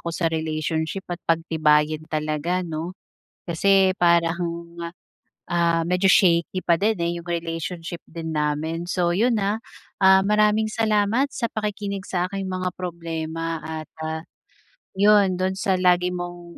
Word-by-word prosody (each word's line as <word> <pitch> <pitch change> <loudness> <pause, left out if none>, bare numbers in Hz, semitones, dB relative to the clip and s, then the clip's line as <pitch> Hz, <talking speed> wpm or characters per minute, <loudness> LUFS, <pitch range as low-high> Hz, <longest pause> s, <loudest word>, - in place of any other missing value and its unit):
ako - - -5
sa 165 -2 0
relationship 160 +3 -2
at 175 - -6
pagtibayin 155 -2 +2
talaga, 155 +4 -1
'no. 170 +3 -5 0.5
Kasi 190 +2 +3
parang, 170 0 +1 0.7
ah, 170 -1 +1
medyo 180 +2 +2
shaky 185 -1 +3
pa 170 -1 +3
din, 215 +1 +2
eh, 170 - 0
'yung 170 - -14
relationship 170 0 -4
din 160 0 -6
namin. 155 +3 -2
So 175 -1 +1
'yun 230 +6 +2
ah, 210 +3 0 0.4
ah, 190 0 +6
maraming 210 +1 +2
salamat 220 +4 +2
sa 235 -3 -2
pakikinig 205 -2 -4
sa 180 -1 0
aking 195 -1 -3
mga 185 -1 -2
problema 165 -2 -4
at 155 0 -7
ah, 160 +1 -4 0.7
'yun 200 -2 +5
do'n 185 +1 0
sa 190 -1 0
lagi 180 0 +3
mong 175 -1 -7
175 Hz, 140 wpm, -23 LUFS, 165-190 Hz, 0.7 s, ah